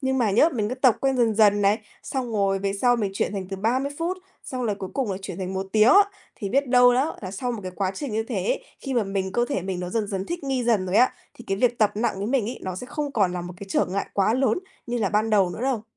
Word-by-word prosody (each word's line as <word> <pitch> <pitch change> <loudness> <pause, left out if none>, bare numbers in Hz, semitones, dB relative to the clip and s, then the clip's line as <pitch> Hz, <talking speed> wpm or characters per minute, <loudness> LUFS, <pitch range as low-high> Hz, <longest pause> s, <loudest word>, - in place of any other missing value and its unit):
Nhưng 265 -1 0
mà 230 -4 +2
nhé, 235 +11 +5
mình 210 -3 0
cứ 250 - -2
tập 255 -3 +4
quen 270 -1 +1
dần 230 -3 +2
dần 205 -1 +4
này, 200 +2 +3 0.2
xong 255 -3 -3
rồi 195 -2 +1
về 195 0 -1
sau 245 -1 +4
mình 205 -4 -1
chuyển 195 - -1
thành 190 -2 -4
từ 195 - -4
30 255 +8 0
phút, 345 +3 -1 0.3
xong 255 -1 -4
là 210 -3 0
cuối 190 -2 -7
cùng 260 -7 -1
là - - -3
chuyển 190 -2 -6
thành 190 0 -4
1 190 +1 -2
tiếng 215 +1 +5
á. 400 +6 +8 0.3
Thì 200 -4 -5
biết 275 +4 +1
đâu 245 0 +6
đó 270 +6 0
là 185 - -5
sau 245 +6 -3
một 225 - -5
cái 185 -1 -6
quá 190 -2 0
trình 255 +2 -5
như 220 +1 0
thế - - -3
ấy, - - -1 0.2
khi 270 -2 -4
mà 235 - +3
mình, 195 -1 -2
cơ 240 +3 +2
thể 195 -11 -1
mình 185 -1 -3
nó 180 - -4
dần 215 +1 -1
dần 195 -1 -3
thích 345 -3 -4
nghi 265 -3 -1
dần 215 -6 +2
rồi 185 - 0
á, 250 +3 +5 0.2
thì 235 - -13
cái 195 - -1
việc 240 +2 +1
tập 215 -2 +4
nặng 225 +3 0
với 200 - -2
mình 245 -2 +1
ấy, - - -7
nó 185 -1 -4
sẽ 250 - -6
không 290 0 -4
còn 195 -5 +2
là 180 - -3
một 175 +1 -7
cái 200 - -9
trở - - +2
ngại 195 +2 -2
quá 200 +3 +2
lớn 260 -1 +2 0.3
như 240 0 -2
là 205 - +1
ban 215 +2 +1
đầu 195 -4 +3
nữa 175 - -7
đâu. 255 -5 0
220 Hz, 310 wpm, -24 LUFS, 195-255 Hz, 0.3 s, á